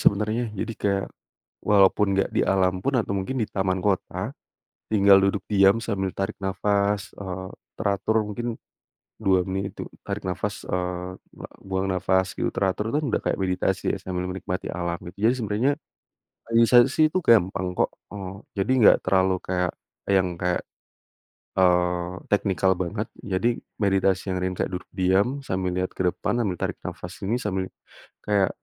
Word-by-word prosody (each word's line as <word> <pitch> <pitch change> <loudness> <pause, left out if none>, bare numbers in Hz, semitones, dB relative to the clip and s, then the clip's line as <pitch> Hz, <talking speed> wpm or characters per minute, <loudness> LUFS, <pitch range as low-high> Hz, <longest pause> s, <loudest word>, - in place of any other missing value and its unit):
sebenernya. 110 +4 +2
Jadi 115 +3 -3
kayak, 100 -1 0 0.6
walaupun 100 0 +4
nggak 95 - +1
di - - +3
alam 95 -1 +2
pun 140 - 0
atau 105 - -2
mungkin 115 +7 -2
di 110 - 0
taman 95 -1 0
kota, 100 -3 -1 0.6
tinggal 100 -2 +7
duduk 100 0 +1
diam 100 +2 +5
sambil 95 -4 -1
tarik 95 0 -2
nafas, 100 +1 0
eee, 95 -1 -6 0.3
teratur 110 +1 +1
mungkin, 120 +2 -3 0.7
2 95 -2 +3
menit 95 +1 -3
itu - - -4 0.2
tarik - - -5
nafas, 100 +3 -3
eee, 90 0 -3 0.5
buang 95 0 -2
nafas 95 +1 +1
gitu - - -1
teratur 100 +3 -1
tuh 145 - 0
kan 150 - 0
udah - - +1
kayak - - -1
meditasi 95 -1 0
ya - - -1
sambil 90 -1 -3
menikmati 90 0 -4
alam 85 -1 -2
gitu, 105 +4 +1
jadi - - +3
sebenernya, 110 +4 +1 0.8
meditasi 120 +6 +5
itu 185 - +2
gampang 95 - +3
kok, - - +2 0.2
eee, 95 -2 -6 0.2
jadi 95 +6 +1
nggak - - +8
terlalu 95 0 +3
kayak, 90 -1 0 0.4
yang 95 -2 +3
kayak, 90 0 0 1.0
eee, 90 -1 +3 0.2
teknikal 95 -2 +2
banget, 100 +4 -2
jadi 95 +3 0 0.3
meditasi 95 -1 +2
yang 95 - -1
ringan 90 0 -1
kayak - - -2
duduk - - -10
diam 95 +9 +2
sambil 95 -6 -2
lihat 95 0 -1
ke 95 - 0
depan 105 +3 -1
sambil 90 -3 -1
tarik - - -2
nafas 90 +3 -7
ini 110 - +1
sambil 95 -2 -1 0.6
kayak 100 -3 +3
95 Hz, 155 wpm, -25 LUFS, 95-105 Hz, 1.0 s, nggak